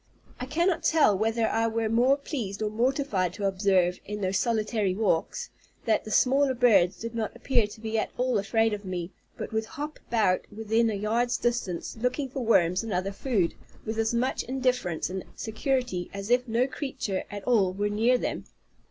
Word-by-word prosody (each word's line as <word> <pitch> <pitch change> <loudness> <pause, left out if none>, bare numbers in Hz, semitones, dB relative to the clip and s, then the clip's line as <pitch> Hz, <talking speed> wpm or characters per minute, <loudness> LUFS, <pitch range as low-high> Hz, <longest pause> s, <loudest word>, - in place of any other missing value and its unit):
I 250 - -4
cannot 340 +5 +1
tell 300 -11 +4
whether 225 +3 +1
I 225 +1 +1
were 225 0 -1
more 245 +5 +3
pleased 225 -9 -4
or 210 - -1
mortified 230 - 0
to 205 - -3
observe, 190 -2 +2
in 210 +1 -6
those 190 0 +1
solitary 215 -4 0
walks, 220 - 0 0.3
that 220 -2 +1
the - - -6
smaller 265 +4 +3
birds 205 -8 +4
did 230 +1 -6
not 225 -2 -3
appear 235 -6 +1
to 210 - -12
be 220 0 -1
at - - -1
all 250 -3 +1
afraid 225 +2 +1
of 205 0 -4
me, 180 -2 -4 0.3
but - - -6
would 220 0 0
hop 295 +6 -6
about 215 -6 +2
within 220 +2 +1
a 215 - -1
yard's 230 +4 0
distance, 235 -8 -2
looking 250 +4 -1
for 260 0 -4
worms 180 -6 +3
and 225 -1 -6
other 185 +2 -1
food, 200 -5 0 0.3
with 220 +1 -3
as 225 0 +1
much 240 +2 0
indifference 250 -10 -1
and 190 0 -4
security 245 -4 -2
as 200 +3 -5
if 250 +1 +3
no 235 +2 +2
creature 260 -8 -3
at 205 -1 -7
all 210 -7 +3
were 205 +2 -1
near 225 +5 +3
them. - - -3
225 Hz, 185 wpm, -27 LUFS, 200-250 Hz, 0.3 s, tell